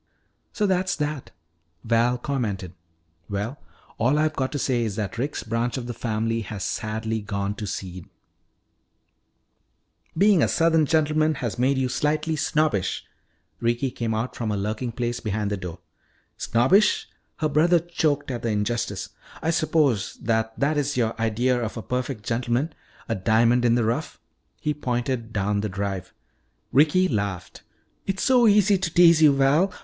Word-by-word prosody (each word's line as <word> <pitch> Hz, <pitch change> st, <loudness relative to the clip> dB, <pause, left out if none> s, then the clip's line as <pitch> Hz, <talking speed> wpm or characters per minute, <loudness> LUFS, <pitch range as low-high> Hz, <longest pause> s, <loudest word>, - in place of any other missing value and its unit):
"So 210 Hz, -, 0 dB
that's 185 Hz, -1 st, +1 dB
that," 150 Hz, -2 st, -3 dB, 0.5 s
Val 115 Hz, +2 st, +2 dB
commented. 105 Hz, -, -3 dB, 0.6 s
"Well, 105 Hz, +7 st, -3 dB, 0.4 s
all 130 Hz, +6 st, +3 dB
I've 155 Hz, 0 st, +1 dB
got 130 Hz, -1 st, -1 dB
to -, -, -1 dB
say 125 Hz, -3 st, 0 dB
is 110 Hz, -4 st, -2 dB
that 105 Hz, +1 st, -4 dB
Rick's 140 Hz, +4 st, -2 dB
branch 115 Hz, +3 st, -1 dB
of 125 Hz, -, -4 dB
the 120 Hz, -, -4 dB
family 115 Hz, 0 st, -1 dB
has 105 Hz, -3 st, -6 dB
sadly 110 Hz, +2 st, -2 dB
gone 100 Hz, -1 st, -3 dB
to 105 Hz, -, -5 dB
seed 90 Hz, -2 st, -6 dB, 1.0 s
" 80 Hz, -, -30 dB
"Being 200 Hz, -1 st, +5 dB
a -, -, +4 dB
southern 165 Hz, -2 st, +3 dB
gentleman 155 Hz, 0 st, +2 dB
has 120 Hz, -3 st, -4 dB
made 135 Hz, +2 st, +2 dB
you 130 Hz, -1 st, +1 dB
slightly 155 Hz, +4 st, 0 dB
snobbish." 150 Hz, -, 0 dB, 0.5 s
Ricky 120 Hz, +3 st, 0 dB
came 115 Hz, -2 st, -2 dB
out 115 Hz, +3 st, -3 dB
from 115 Hz, -3 st, -3 dB
her 105 Hz, -, -1 dB
lurking 110 Hz, +5 st, -2 dB
place 120 Hz, +1 st, -2 dB
behind 105 Hz, -2 st, -2 dB
the 100 Hz, -, -1 dB
door. 90 Hz, -3 st, -7 dB, 0.6 s
"Snobbish!" 130 Hz, -, +3 dB, 0.3 s
her 155 Hz, -, -1 dB
brother 165 Hz, +4 st, +4 dB
choked 155 Hz, -4 st, -1 dB
at 120 Hz, -2 st, -4 dB
the 115 Hz, -, -1 dB
injustice. 105 Hz, -2 st, -2 dB, 0.3 s
"I 160 Hz, -, 0 dB
suppose 155 Hz, -, +1 dB
that 110 Hz, -1 st, -1 dB
that 150 Hz, +2 st, +1 dB
is 145 Hz, -1 st, -1 dB
your 115 Hz, -2 st, +1 dB
idea 120 Hz, +3 st, +1 dB
of 115 Hz, 0 st, -4 dB
a 115 Hz, -, -5 dB
perfect 125 Hz, -3 st, -3 dB
gentleman, 120 Hz, +6 st, -1 dB, 0.3 s
a 115 Hz, -, 0 dB
diamond 115 Hz, +4 st, +3 dB
in 120 Hz, -1 st, +4 dB
the 120 Hz, -, +2 dB
rough 120 Hz, +8 st, -2 dB, 0.2 s
" -, -, -45 dB
He 150 Hz, -, +2 dB
pointed 120 Hz, -4 st, -2 dB
down 105 Hz, -1 st, 0 dB
the 105 Hz, -, -2 dB
drive. 95 Hz, -1 st, -4 dB, 0.6 s
Ricky 155 Hz, +7 st, +4 dB
laughed. 100 Hz, -, -3 dB, 0.5 s
"It's 195 Hz, -1 st, -1 dB
so 250 Hz, -3 st, +5 dB
easy 205 Hz, -2 st, +4 dB
to 175 Hz, -3 st, -2 dB
tease 170 Hz, -2 st, +6 dB
you, 150 Hz, -3 st, +6 dB
Val. 145 Hz, +8 st, +3 dB
120 Hz, 165 wpm, -24 LUFS, 110-150 Hz, 1.0 s, tease